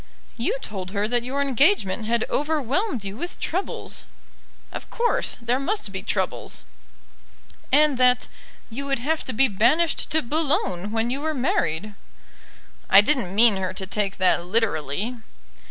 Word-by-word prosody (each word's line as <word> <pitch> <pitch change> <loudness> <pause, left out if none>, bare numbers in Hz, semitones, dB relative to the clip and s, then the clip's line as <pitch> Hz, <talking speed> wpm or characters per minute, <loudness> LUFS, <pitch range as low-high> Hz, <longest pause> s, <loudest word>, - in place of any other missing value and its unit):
"You 380 - -1
told 190 -3 -5
her 205 0 0
that 240 +1 +1
your 270 +4 -1
engagement 270 - +2
had 235 +1 +1
overwhelmed 295 - -1
you 195 0 -5
with 345 +6 -6
troubles." 370 +4 -3 0.7
"Of - - -8
course; 475 0 0
there 240 +2 0
must 405 +10 -2
be - - -4
troubles." - - -3 1.1
"And 290 -1 +4
that 250 -1 +4 0.4
you 280 +5 -5
would 275 -1 0
have 300 +6 -1
to - - -2
be 260 +4 +4
banished 255 - +2
to 315 0 +1
Boulogne 235 - -1
when 225 +1 0
you 275 +2 -2
were 315 0 -2
married." 210 - -1 1.0
"I 195 - +9
didn't 210 -6 0
mean 220 -2 +7
her 185 -1 -3
to 190 - -3
take 200 0 -2
that 185 -2 +2
literally." 200 - -1
240 Hz, 150 wpm, -23 LUFS, 205-290 Hz, 1.1 s, I